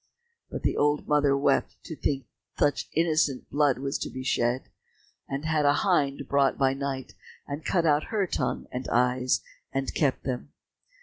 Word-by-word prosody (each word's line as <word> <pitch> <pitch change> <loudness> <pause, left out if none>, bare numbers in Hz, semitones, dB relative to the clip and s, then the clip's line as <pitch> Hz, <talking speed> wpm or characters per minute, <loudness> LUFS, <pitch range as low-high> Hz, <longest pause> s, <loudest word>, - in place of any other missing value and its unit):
But - - -6
the - - +1
old 145 0 +2
mother 145 -2 +3
wept 140 -1 +1
to 160 - -7
think 135 -3 -1 0.3
such 145 -1 +1
innocent 155 -5 +1
blood 145 -2 +3
was 135 +1 -2
to - - -3
be 130 - -6
shed, 125 -1 +1 0.7
and 140 +3 -3
had 155 -1 +2
a 145 0 +5
hind 140 -7 +1
brought 140 -1 +2
by 135 -1 +3
night 135 -1 -4 0.3
and 145 +2 -5
cut 170 -3 +1
out 150 -1 +3
her 210 -3 0
tongue 130 -7 -2
and 125 +1 -4
eyes, 125 +1 +2 0.3
and 135 0 -2
kept 140 -4 +1
them. 130 +1 -4
140 Hz, 170 wpm, -27 LUFS, 130-150 Hz, 0.7 s, a